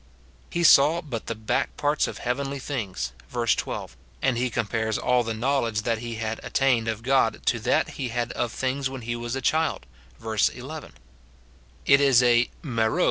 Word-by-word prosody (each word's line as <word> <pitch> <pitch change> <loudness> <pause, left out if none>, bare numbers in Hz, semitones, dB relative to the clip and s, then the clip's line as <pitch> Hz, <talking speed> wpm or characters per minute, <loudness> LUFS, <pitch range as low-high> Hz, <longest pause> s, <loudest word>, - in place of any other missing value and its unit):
He 170 - -1
saw 155 +1 +6
but 135 -9 -6
the 115 - -2
back 110 0 -2
parts 145 +1 +1
of - - -6
heavenly 135 +3 -2
things, 110 - -4 0.2
verse 115 +3 +1
12, - - -4 0.2
and 125 -1 0
compares 110 -1 -1
all 125 0 +2
the 115 -1 -3
knowledge 115 -3 0 0.2
he 120 0 -5
had 110 0 -3
attained 125 -4 +1
of 110 0 -3
God 130 -3 +2
to 120 - +2
that 120 +3 +1
he 130 - -1
had 120 0 -2
of 120 -1 -2
things 130 +2 -1
when 135 -1 -7
he 120 +1 -3
was 120 +1 -4
a 135 - -3
child, 160 +5 0 0.3
verse 110 -1 +1
11. 140 +5 -9 0.9
It 140 0 +6
is 135 -3 +5
a 120 0 +4
IXe'po. 115 0 0
120 Hz, 175 wpm, -25 LUFS, 115-135 Hz, 0.9 s, saw